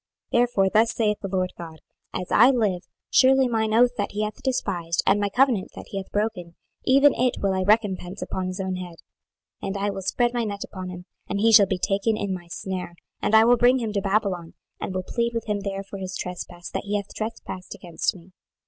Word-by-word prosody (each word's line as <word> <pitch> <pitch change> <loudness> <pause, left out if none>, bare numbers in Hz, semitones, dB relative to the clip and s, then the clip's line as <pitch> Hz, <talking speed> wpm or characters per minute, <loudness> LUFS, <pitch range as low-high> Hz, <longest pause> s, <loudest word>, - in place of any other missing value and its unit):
26:017:019 - - +4
Therefore 240 -6 +3
thus 225 +1 +3
saith 210 -2 +1
the 195 - -3
Lord 185 -1 -1
GOD; 160 -2 -8 0.3
As 180 - -5
I 240 +4 +7
live, 215 -9 +1 0.3
surely 265 0 +5
mine 220 -2 0
oath 240 +2 +5
that 205 -1 -2
he 210 +1 -1
hath 215 0 -5
despised, 180 -10 -1
and 195 +2 +4
my 205 0 0
covenant 245 -3 +2
that - - -10
he 195 - -5
hath 190 - -6
broken, 205 -5 -2 0.3
even 275 +2 +6
it 250 0 +1
will 195 -1 +1
I 190 - 0
recompense 195 -2 +1
upon 185 -1 -3
his 185 +1 -5
own 190 -1 -2
head. 180 -2 -7 0.7
26:017:020 - - -4
And 195 +1 -3
I 200 +1 0
will 195 -1 -5
spread 240 +5 0
my 240 -1 0
net 205 -2 -4
upon 185 -2 -7
him, 180 0 -8 0.2
and 200 - -1
he 225 +2 +4
shall 210 -3 +8
be 190 - -1
taken 200 +4 0
in 200 -2 -2
my 175 -2 -7
snare, 180 0 -5 0.3
and 215 - +2
I 220 +1 +7
will 245 +1 +5
bring 245 +2 +5
him 225 -4 -3
to 200 - 0
Babylon, 195 -4 -1 0.2
and - - -4
will 185 - -1
plead 235 +3 -2
with 230 - -2
him 210 -2 -1
there 195 -1 -4
for 200 0 -9
his 185 0 -5
trespass 175 -1 -6
that - - -4
he 205 +1 -2
hath 200 -1 -3
trespassed 215 -4 -6
against 175 +4 -2
me. 180 +1 -15
200 Hz, 230 wpm, -24 LUFS, 185-225 Hz, 0.7 s, shall